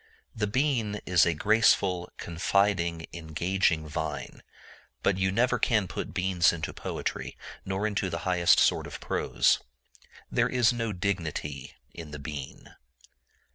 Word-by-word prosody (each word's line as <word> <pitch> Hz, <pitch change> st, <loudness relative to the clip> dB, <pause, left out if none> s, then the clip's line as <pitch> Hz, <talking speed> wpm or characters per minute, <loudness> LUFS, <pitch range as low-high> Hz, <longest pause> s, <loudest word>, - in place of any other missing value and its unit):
The 105 Hz, -1 st, 0 dB
bean 115 Hz, -3 st, 0 dB
is 85 Hz, -3 st, +4 dB
a 85 Hz, -, +1 dB
graceful, 95 Hz, -2 st, +3 dB
confiding, 85 Hz, -1 st, 0 dB
engaging 85 Hz, 0 st, 0 dB
vine; 75 Hz, -, -5 dB, 0.6 s
but 95 Hz, -1 st, +2 dB
you 95 Hz, 0 st, +2 dB
never 125 Hz, +4 st, +2 dB
can 105 Hz, -4 st, +2 dB
put 90 Hz, -, -5 dB
beans 90 Hz, -2 st, +3 dB
into 80 Hz, -2 st, -4 dB
poetry, -, -, -4 dB, 0.3 s
nor 95 Hz, +2 st, -2 dB
into 105 Hz, -2 st, -1 dB
the 85 Hz, -, -3 dB
highest 90 Hz, -2 st, +4 dB
sort -, -, +3 dB
of -, -, -8 dB
prose. -, -, +2 dB, 0.7 s
There -, -, +2 dB
is 125 Hz, -2 st, +3 dB
no 115 Hz, -2 st, -2 dB
dignity 80 Hz, -8 st, -3 dB, 0.2 s
in 85 Hz, -2 st, -9 dB
the 75 Hz, -, -7 dB
bean. 70 Hz, -2 st, -8 dB
95 Hz, 135 wpm, -28 LUFS, 85-105 Hz, 0.7 s, is